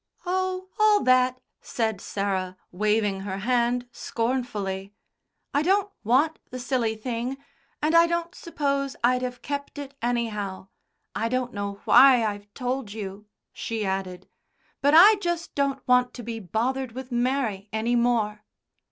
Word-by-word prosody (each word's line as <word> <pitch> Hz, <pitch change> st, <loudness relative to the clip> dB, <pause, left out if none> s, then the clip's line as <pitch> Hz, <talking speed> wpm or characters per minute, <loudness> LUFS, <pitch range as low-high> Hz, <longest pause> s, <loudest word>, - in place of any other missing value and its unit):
"Oh, 370 Hz, +1 st, -1 dB
all 430 Hz, -1 st, +5 dB
that!" 255 Hz, 0 st, +3 dB, 0.2 s
said 220 Hz, -4 st, -2 dB
Sarah, 190 Hz, -2 st, -2 dB
waving 210 Hz, +1 st, +1 dB
her 195 Hz, 0 st, -4 dB
hand 245 Hz, +3 st, +1 dB
scornfully. 210 Hz, -6 st, -3 dB, 0.6 s
'"I 285 Hz, -, +3 dB
don't 395 Hz, +4 st, +2 dB
want 275 Hz, +8 st, +2 dB
the 255 Hz, -, -6 dB
silly 240 Hz, -3 st, -1 dB
thing, 240 Hz, +3 st, -3 dB, 0.5 s
and 310 Hz, +2 st, +2 dB
I 335 Hz, 0 st, +7 dB
don't 340 Hz, 0 st, -2 dB
suppose 280 Hz, -4 st, -2 dB
I'd 250 Hz, +1 st, +3 dB
have 250 Hz, -1 st, -5 dB
kept 285 Hz, 0 st, -5 dB
it, 280 Hz, -1 st, -7 dB
anyhow. 210 Hz, -5 st, -2 dB, 0.4 s
I 225 Hz, +1 st, -1 dB
don't 255 Hz, 0 st, -1 dB
know 200 Hz, -1 st, -4 dB
why 250 Hz, -2 st, +7 dB
I've 205 Hz, -1 st, -4 dB
told 250 Hz, -4 st, -3 dB
you," 205 Hz, -1 st, -7 dB, 0.3 s
she 225 Hz, -2 st, -3 dB
added. 190 Hz, -1 st, -3 dB, 0.5 s
"But 285 Hz, +2 st, +4 dB
I 405 Hz, +6 st, +9 dB
just 345 Hz, -2 st, -2 dB
don't 280 Hz, -1 st, -1 dB
want 250 Hz, 0 st, +3 dB
to 245 Hz, -, -7 dB
be 230 Hz, 0 st, -5 dB
bothered 235 Hz, +6 st, -2 dB
with 260 Hz, +1 st, -8 dB
Mary 240 Hz, -5 st, -1 dB
any 225 Hz, +2 st, 0 dB
more." 230 Hz, -3 st, +1 dB
245 Hz, 145 wpm, -25 LUFS, 210-275 Hz, 0.6 s, I